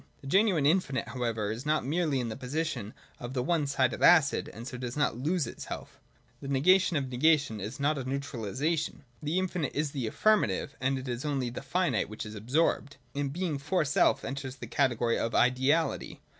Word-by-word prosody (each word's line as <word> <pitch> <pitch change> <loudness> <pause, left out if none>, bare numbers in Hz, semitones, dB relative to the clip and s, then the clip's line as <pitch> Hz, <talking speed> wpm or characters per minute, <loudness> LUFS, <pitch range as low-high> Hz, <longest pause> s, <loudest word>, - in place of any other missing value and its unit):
The - - -14
genuine 185 -1 +3
infinite 150 -4 +1
however 115 -4 -2
is 115 +3 -5
not 150 -2 +1
merely 155 -1 +1
in 120 -2 -2
the 110 - -4
position 130 -4 -3 0.2
of 120 +2 -6
the 125 - 0
one 155 0 +1
sided 130 -3 +1
acid, 160 -5 +5
and 115 +2 -9
so 125 - -6
does 125 +1 -5
not 145 - +1
lose 160 +3 0
itself 115 - -8 0.4
The 140 - -6
negation 175 +6 +4
of 135 -2 -2
negation 140 -3 +2
is 105 +8 -6
not 145 +1 +1
a - - -3
neutralisation: 140 - -2 0.2
the 150 +4 -1
infinite 180 -5 -1
is 150 -1 0
the 130 -6 -3
affirmative, 210 - +1
and 135 +1 +1
it 130 0 -6
is 120 0 -3
only 135 -5 -1
the - - -6
finite 140 - 0
which 110 0 -6
is 105 - -7
absorbed. 140 +6 0 0.2
In 140 0 -1
Being 160 -1 -2
for 155 +3 0
self 140 - +2
enters 135 -1 -5
the - - -8
category 120 -4 +1
of 115 - -1
Ideality. 130 +6 +2
140 Hz, 190 wpm, -29 LUFS, 125-155 Hz, 0.4 s, acid